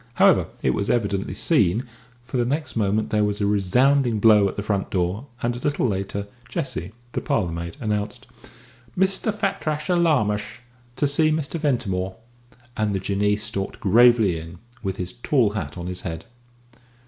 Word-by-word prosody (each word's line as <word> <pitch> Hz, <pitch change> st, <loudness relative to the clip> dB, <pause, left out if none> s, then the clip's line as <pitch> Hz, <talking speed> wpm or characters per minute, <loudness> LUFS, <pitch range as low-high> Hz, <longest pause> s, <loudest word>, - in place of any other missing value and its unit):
However, -, -, +5 dB, 0.2 s
it 65 Hz, -, +3 dB
was 100 Hz, +9 st, -1 dB
evidently 100 Hz, -4 st, 0 dB
seen, 115 Hz, -, +2 dB, 0.4 s
for 125 Hz, +1 st, -3 dB
the 120 Hz, -, +2 dB
next 140 Hz, +2 st, -2 dB
moment 105 Hz, 0 st, 0 dB
there 105 Hz, -1 st, +2 dB
was 105 Hz, 0 st, -1 dB
a 100 Hz, -, +1 dB
resounding 120 Hz, +5 st, +3 dB
blow 105 Hz, -2 st, +6 dB
at -, -, -8 dB
the 100 Hz, -, -3 dB
front 100 Hz, -2 st, -1 dB
door, 95 Hz, +7 st, -1 dB, 0.2 s
and 120 Hz, 0 st, 0 dB
a -, -, -6 dB
little 145 Hz, -1 st, 0 dB
later 100 Hz, 0 st, -2 dB, 0.2 s
Jessie, 125 Hz, -8 st, -3 dB, 0.2 s
the -, -, -2 dB
parlour 90 Hz, -6 st, 0 dB
maid, 85 Hz, 0 st, -5 dB
announced 105 Hz, +3 st, -2 dB, 0.7 s
"Mr. 190 Hz, +3 st, +1 dB
Fatrasher 180 Hz, -5 st, -1 dB
Larmash 120 Hz, -9 st, +1 dB, 0.3 s
to 145 Hz, -, +1 dB
see 150 Hz, +2 st, +3 dB
Mr. 155 Hz, +1 st, -1 dB
Ventimore," 100 Hz, -11 st, -1 dB, 0.6 s
and 105 Hz, -2 st, 0 dB
the -, -, 0 dB
Jinnee 100 Hz, +2 st, +1 dB
stalked 100 Hz, -2 st, -4 dB
gravely 110 Hz, -4 st, +5 dB
in, 85 Hz, +2 st, -10 dB, 0.2 s
with 95 Hz, -3 st, -3 dB
his 90 Hz, 0 st, -4 dB
tall 120 Hz, -2 st, +2 dB
hat 105 Hz, -3 st, -5 dB
on 85 Hz, -, -5 dB
his 90 Hz, 0 st, -4 dB
head. 80 Hz, -2 st, -5 dB
105 Hz, 165 wpm, -23 LUFS, 95-130 Hz, 0.7 s, blow